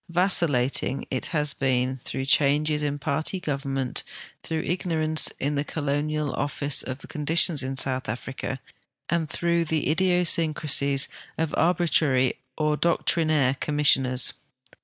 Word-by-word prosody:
Vacillating 170 -8 +2
it 130 - -2
has 150 -3 0
been, 130 -1 0
through 130 +1 -4
changes 150 +2 +2
in 145 -1 -2
party 155 +5 -1
government, 135 -5 -2 0.4
through 160 -1 -3
ignorance 160 -3 +2
in 145 +2 -1
the 145 0 -1
colonial 150 0 -2
office 145 0 0
of 130 0 -5
conditions 155 0 +2
in 135 0 -4
South 130 -3 0
Africa, 130 +3 -5 0.5
and 165 -2 -1
through 170 +1 0
the 155 -2 -1
idiosyncrasies 160 -5 +2 0.3
of 160 -2 -2
arbitrary 160 -7 +2 0.2
or 150 -1 +1
doctrinaire 155 -5 +1
commissioners. 135 -4 +2
150 Hz, 115 wpm, -25 LUFS, 135-160 Hz, 0.5 s, Vacillating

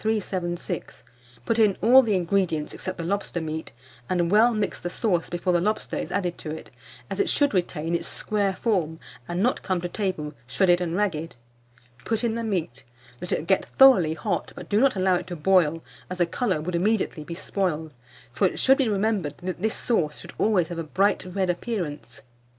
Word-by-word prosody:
376; 185 -5 -3 0.4
put 230 -1 +1
in 210 -3 +4
all 250 +5 +7
the 220 -5 +1
ingredients 175 -4 0
except 185 -1 -5
the 170 - -4
lobster 195 0 -2
meat, 160 -1 -5 0.4
and 175 -1 +1
well 220 +4 +6
mix 215 -3 -2
the 175 - -3
sauce 180 -4 0
before 175 +1 -1
the 175 - +3
lobster 210 +4 -1
is - - -4
added 180 -3 -2
to 155 - -6
it, 155 - -7 0.4
as - - -5
it 400 - +2
should 285 -4 +2
retain 170 -3 -1
its 170 - -1
square 200 -3 -1
form, 170 -9 0 0.3
and 175 +3 -1
not 250 - +1
come 185 -2 -1
to 175 - -3
table 175 -6 -3
shredded 175 +7 +3
and 170 -1 -2
ragged. 170 -7 -1 0.7
Put 225 +1 -1
in 235 -2 +1
the 230 0 -3
meat, 175 - -3 0.4
let 180 - -4
it - - -1
get 190 +2 +2
thoroughly 195 -13 +5
hot, 180 +1 -3
but - - -9
do 205 - +3
not 270 -3 +4
allow 185 -1 +3
it - - -7
to 175 - -5
boil, 165 -1 +2 0.3
as 185 - -5
the 175 - +3
colour 185 -2 -1
would 175 +3 -4
immediately 185 -3 0
be 170 +2 -7
spoiled; 160 -5 -2 0.4
for 190 - +3
it - - -5
should 270 +1 +4
be 260 -4 +2
remembered 200 -7 0
that 180 -1 -4
this 220 +1 0
sauce 160 -11 -1
should - - -10
always 200 -6 +2
have 170 -1 -5
a - - -2
bright 195 +6 +1
red 185 -1 +1
appearance. 170 - -5
185 Hz, 200 wpm, -25 LUFS, 170-210 Hz, 0.7 s, all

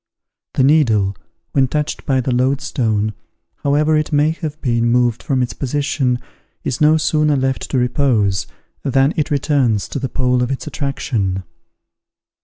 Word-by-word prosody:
The 130 - +3
needle, 115 -10 +3 0.4
when 135 -2 +2
touched 150 +3 -3
by 135 -2 +2
the 125 - -2
loadstone, 125 -5 0 0.4
however 150 +2 +2
it 155 0 0
may 150 +1 +3
have 155 -2 -5
been 120 -4 +1
moved 120 -1 +2
from 130 -2 0
its 120 - -3
position, 135 -2 -1 0.5
is 125 - -3
no 155 +1 +5
sooner 150 -1 +2
left 130 -1 -1
to 135 - 0
repose, 125 -6 +1 0.3
than 135 +3 +2
it 155 -3 0
returns 135 -7 +1
to - - -3
the 130 -1 -3
pole 125 -2 +1
of 125 - 0
its 135 -3 -3
attraction. 120 -11 -2
135 Hz, 150 wpm, -18 LUFS, 120-145 Hz, 0.5 s, no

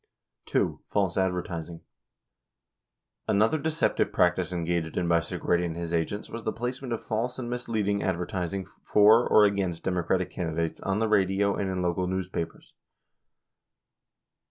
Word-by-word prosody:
(ii) - - +4 0.2
False 95 -4 +1
Advertising. 90 -3 -2 0.8
— - - -58
Another 110 +10 +3
deceptive 160 +2 0
practice 90 +1 +2
engaged 85 -2 -2
in 90 - +1
by 85 -1 +4
Segretti 85 +1 -1
and 85 -1 -3
his 85 0 -4
agents 85 +5 -1
was 115 0 -7
the 110 - -1
placement 125 +3 -4
of 115 - -3
false 115 +3 -2
and 120 -2 -4
misleading 110 -5 -1
advertising 90 +1 -2
for 105 +4 +4
or 105 - +7
against 95 -4 -1
Democratic 90 0 0
candidates 85 -2 -2
on 95 0 -1
the 110 +1 +1
radio 100 -1 +2
and 100 - -2
in 90 -1 -2
local 90 +1 0
newspapers. 95 -2 -4
95 Hz, 140 wpm, -27 LUFS, 85-105 Hz, 0.8 s, or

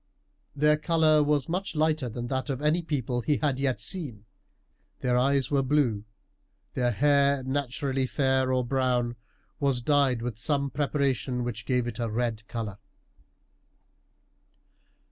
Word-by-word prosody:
Their 150 +1 +4
colour 155 -1 +3
was 145 -2 +1
much 180 +1 -3
lighter 155 -4 +1
than 120 +2 -5
that 130 +2 -2
of 135 -2 -2
any 150 +4 +2
people 130 -6 -2
he 145 +4 +1
had 140 -4 0
yet 135 -2 0
seen. 135 - -6 0.8
Their 125 -1 +1
eyes 135 +2 +2
were 140 -1 +3
blue, 130 -7 +1 0.7
their 125 -2 +1
hair, 140 +2 +3
naturally 135 0 -1
fair 130 -1 +1
or 130 -1 +1
brown, 125 -2 0 0.4
was 135 -4 +1
dyed 135 -4 +2
with 120 -3 -4
some 140 +1 -1
preparation 135 -3 0
which 120 -2 -5
gave 125 -2 +1
it 120 0 -5
a 115 -1 -1
red 110 -1 -2
colour. 110 -4 -5
130 Hz, 140 wpm, -27 LUFS, 120-145 Hz, 0.8 s, Their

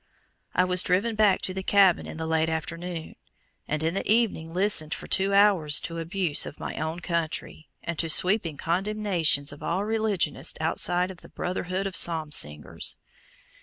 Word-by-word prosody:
I 180 - +4
was 180 0 +4
driven 200 +6 +1
back 210 -3 +2
to 185 - -2
the 190 - -4
cabin 190 -2 +3
in - - -8
the 160 - -4
late 160 0 +1
afternoon, 165 +1 -5 0.5
and 155 +1 -2
in 165 +1 0
the 195 - -1
evening 215 -8 +1
listened 180 -4 +2
for - - -9
two 195 +1 +2
hours 195 -7 +4
to 165 0 -4
abuse 165 -2 0
of - - -10
my - - -5
own 160 +2 -4
country, 165 -2 -3
and 170 -2 -5
to 165 - -1
sweeping 180 -2 +2
condemnations 175 -5 0
of 145 - -12
all 190 +4 -2
religionists 220 -4 -1
outside 175 +3 0
of 185 - -12
the - - -15
brotherhood 185 +1 -3
of 195 -2 -4
"Psalm 160 -3 +3
singers." 75 - -2
175 Hz, 170 wpm, -26 LUFS, 160-195 Hz, 0.5 s, I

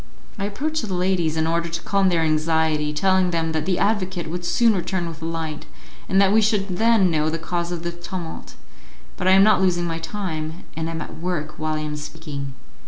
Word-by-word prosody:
I 200 - -1
approach 300 +10 -2
the 200 -5 -3
ladies 180 -3 +1
in 160 - +2
order 170 +1 0
to 170 +1 -3
calm 195 -1 +2
their 170 -2 +2
anxiety, 155 -1 +1
telling 185 +4 +2
them 165 -2 0
that 155 0 -2
the 185 -2 +2
advocate 190 -5 0
would 175 +1 -4
soon 230 +5 +3
return 180 -1 -1
with 165 -1 -8
a - - -4
light, 160 -2 -4 0.4
and 190 - +3
that 195 -1 +5
we 220 - +5
should 200 -3 +1
then 220 -5 +4
know 155 -1 +1
the 165 - -1
cause 170 +1 -3
of 175 -1 -4
the 170 - -2
tumult, 175 -1 -7 0.6
but 180 - -2
I 185 - +7
am 195 +1 +7
not 210 -2 +5
losing 175 -2 +2
my 165 -1 -2
time, 165 -3 -4
and 160 +1 -2
am 165 -1 -3
at - - -10
work 155 -3 -3
while 155 0 -1
I 155 - -2
am 150 0 -3
speaking. 150 -3 -6
170 Hz, 220 wpm, -23 LUFS, 160-190 Hz, 0.6 s, I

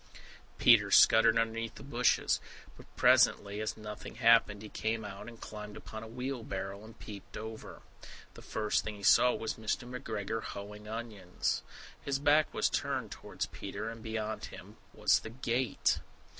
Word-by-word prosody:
Peter - - +6
scuttered 115 0 +6
underneath 115 0 -1
the - - -10
bushes. 125 -3 +2 0.4
But - - -15
presently, 100 +1 +4
as 110 - -3
nothing 105 0 -8
happened, 115 -3 +4
he 105 - -8
came 110 +1 -2
out, 100 +1 -8
and 115 -1 -10
climbed 105 -1 -8
upon 110 - -8
a 110 - -8
wheelbarrow, 110 -5 -5
and 110 +1 -13
peeped 100 -2 -9
over. 110 0 -8 0.5
The - - -12
first 105 -1 -1
thing 110 - -5
he 100 - -12
saw 125 +5 +6
was 110 - -4
Mr. 110 +2 -2
McGregor 110 -3 -4
hoeing 105 +1 -8
onions. 110 -5 -3 0.4
His 140 -1 0
back 145 +2 +3
was - - +1
turned - - -2
towards - - -5
Peter, 105 +3 -6
and 115 0 -10
beyond 110 -1 -3
him - - -11
was - - +3
the - - -8
gate! 120 -1 0
110 Hz, 155 wpm, -32 LUFS, 105-115 Hz, 0.5 s, Peter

